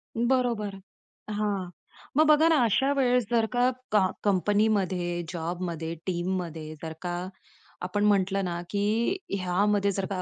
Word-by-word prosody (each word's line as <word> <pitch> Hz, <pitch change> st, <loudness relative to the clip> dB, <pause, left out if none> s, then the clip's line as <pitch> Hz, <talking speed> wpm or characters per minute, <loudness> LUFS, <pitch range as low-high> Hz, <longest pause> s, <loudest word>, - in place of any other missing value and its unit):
बरोबर. 235 Hz, -4 st, 0 dB, 0.6 s
हां. 205 Hz, -3 st, -1 dB, 0.5 s
मग 310 Hz, -, +6 dB
बघा 305 Hz, +2 st, +6 dB
ना 325 Hz, -, +5 dB
अशा 265 Hz, +6 st, +2 dB
वेळेस 250 Hz, -3 st, +3 dB
जर 230 Hz, -2 st, +3 dB
का 245 Hz, +1 st, +4 dB, 0.2 s
का 205 Hz, -3 st, +4 dB, 0.2 s
कंपनीमध्ये, 195 Hz, -3 st, +1 dB
जॉबमध्ये, 170 Hz, -1 st, -4 dB
टीममध्ये 175 Hz, -3 st, -3 dB
जर 160 Hz, -1 st, -5 dB
का 175 Hz, -1 st, -3 dB, 0.7 s
आपण 205 Hz, +3 st, 0 dB
म्हटलं 195 Hz, -1 st, +2 dB
ना, 175 Hz, -1 st, -3 dB
की 215 Hz, -, 0 dB, 0.2 s
ह्यामध्ये 200 Hz, +3 st, +1 dB
जर 195 Hz, 0 st, -2 dB
का 185 Hz, -2 st, -2 dB
200 Hz, 130 wpm, -27 LUFS, 180-220 Hz, 0.7 s, मग